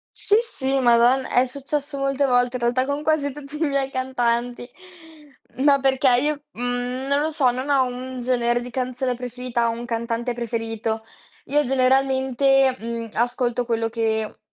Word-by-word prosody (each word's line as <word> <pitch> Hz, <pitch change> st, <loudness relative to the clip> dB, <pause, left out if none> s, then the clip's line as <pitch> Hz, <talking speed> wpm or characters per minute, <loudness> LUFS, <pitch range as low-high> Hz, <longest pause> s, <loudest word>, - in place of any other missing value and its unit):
Sì, 415 Hz, -, +3 dB
sì, 270 Hz, -, -1 dB
madon 245 Hz, +1 st, +4 dB
è 250 Hz, +1 st, +2 dB
successo 280 Hz, +2 st, -4 dB
molte 275 Hz, 0 st, +1 dB
volte 245 Hz, 0 st, +2 dB
in -, -, -6 dB
realtà 245 Hz, +2 st, +2 dB
con 285 Hz, +2 st, -2 dB
quasi 300 Hz, -3 st, +1 dB
tutti 290 Hz, +1 st, -9 dB
i -, -, -6 dB
miei 275 Hz, -1 st, 0 dB
cantanti. 245 Hz, -2 st, -1 dB, 0.9 s
Ma 280 Hz, -1 st, +5 dB
perché 265 Hz, 0 st, +3 dB
io, 295 Hz, +1 st, -1 dB
mhmm, 245 Hz, +2 st, -3 dB
non 280 Hz, +1 st, +2 dB
lo 310 Hz, -, 0 dB
so, 290 Hz, -5 st, +2 dB
non 255 Hz, +4 st, -3 dB
ho 270 Hz, -2 st, +4 dB
un 255 Hz, +1 st, -5 dB
genere 240 Hz, -1 st, +1 dB
di 245 Hz, -, -7 dB
canzone 255 Hz, 0 st, -2 dB
preferita 245 Hz, -1 st, -2 dB
o -, -, +1 dB
un 235 Hz, +1 st, -5 dB
cantante 235 Hz, +1 st, -2 dB
preferito. 225 Hz, -1 st, -3 dB, 0.4 s
Io, 295 Hz, +2 st, +2 dB
generalmente, 265 Hz, 0 st, +2 dB
mhmm, 230 Hz, 0 st, -5 dB
ascolto 245 Hz, +1 st, 0 dB
quello 230 Hz, -1 st, -1 dB
che, 220 Hz, -1 st, -2 dB
255 Hz, 160 wpm, -23 LUFS, 240-270 Hz, 0.9 s, Ma